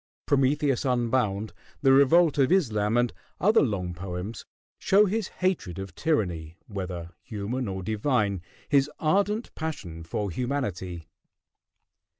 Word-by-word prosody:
"Prometheus 140 Hz, -1 st, +2 dB
Unbound," 120 Hz, -5 st, 0 dB, 0.3 s
"The 135 Hz, -, +6 dB
Revolt 150 Hz, +3 st, +5 dB
of 135 Hz, +2 st, +4 dB
Islam," 115 Hz, -, +2 dB
and 120 Hz, -1 st, +2 dB, 0.3 s
other 215 Hz, +5 st, +5 dB
long 95 Hz, -8 st, -1 dB
poems 90 Hz, +4 st, -6 dB, 0.3 s
show 205 Hz, +2 st, +5 dB
his 210 Hz, 0 st, -1 dB
hatred 175 Hz, -, -2 dB
of 95 Hz, -1 st, -6 dB
tyranny, 85 Hz, -, -1 dB
whether 90 Hz, -4 st, -5 dB
human 115 Hz, +3 st, -3 dB
or 95 Hz, -1 st, -4 dB
divine, 105 Hz, -2 st, 0 dB, 0.3 s
his 140 Hz, 0 st, +3 dB
ardent 200 Hz, +7 st, +1 dB
passion 100 Hz, -, -5 dB
for 100 Hz, +4 st, -3 dB
humanity. 95 Hz, -, -3 dB
120 Hz, 120 wpm, -27 LUFS, 95-145 Hz, 0.3 s, The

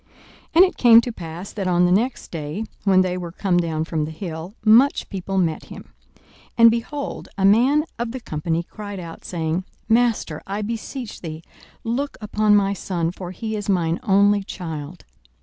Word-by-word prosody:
42:009:037 -, -, -36 dB, 0.5 s
And 355 Hz, +3 st, +9 dB
it 370 Hz, -, -4 dB
came 230 Hz, -2 st, +8 dB
to 245 Hz, -, -4 dB
pass, 175 Hz, -1 st, -8 dB
that 195 Hz, -3 st, -3 dB
on 180 Hz, 0 st, +3 dB
the 175 Hz, -, +2 dB
next 235 Hz, +7 st, 0 dB
day, 160 Hz, +6 st, -4 dB, 0.2 s
when 190 Hz, -2 st, +5 dB
they 180 Hz, -1 st, -1 dB
were 175 Hz, -2 st, -6 dB
come 185 Hz, 0 st, 0 dB
down 160 Hz, -2 st, 0 dB
from 160 Hz, -2 st, -2 dB
the -, -, -6 dB
hill, 160 Hz, +3 st, -7 dB
much 240 Hz, +6 st, +5 dB
people 195 Hz, 0 st, -4 dB
met 165 Hz, -4 st, 0 dB
him. -, -, -12 dB, 0.2 s
42:009:038 -, -, -30 dB, 0.3 s
And, 230 Hz, -1 st, +8 dB
behold, 275 Hz, +5 st, -4 dB
a 195 Hz, -, +2 dB
man 255 Hz, +9 st, +4 dB
of 235 Hz, -1 st, -2 dB
the 260 Hz, -, -5 dB
company 165 Hz, -4 st, -2 dB
cried 205 Hz, +1 st, -8 dB
out, 165 Hz, -2 st, -9 dB
saying, 165 Hz, +1 st, -2 dB, 0.2 s
Master, 225 Hz, -9 st, +1 dB
I 200 Hz, +2 st, -3 dB
beseech 230 Hz, +2 st, -5 dB
thee, 160 Hz, -1 st, -7 dB, 0.4 s
look 260 Hz, +5 st, -2 dB
upon 210 Hz, 0 st, +2 dB
my 200 Hz, -1 st, +3 dB
son: 175 Hz, -4 st, -2 dB
for 180 Hz, -1 st, -8 dB
he 220 Hz, +4 st, -4 dB
is 205 Hz, -1 st, -4 dB
mine 170 Hz, -3 st, +1 dB
only 205 Hz, -2 st, +4 dB
child. 160 Hz, -3 st, -7 dB
195 Hz, 185 wpm, -22 LUFS, 170-225 Hz, 0.5 s, And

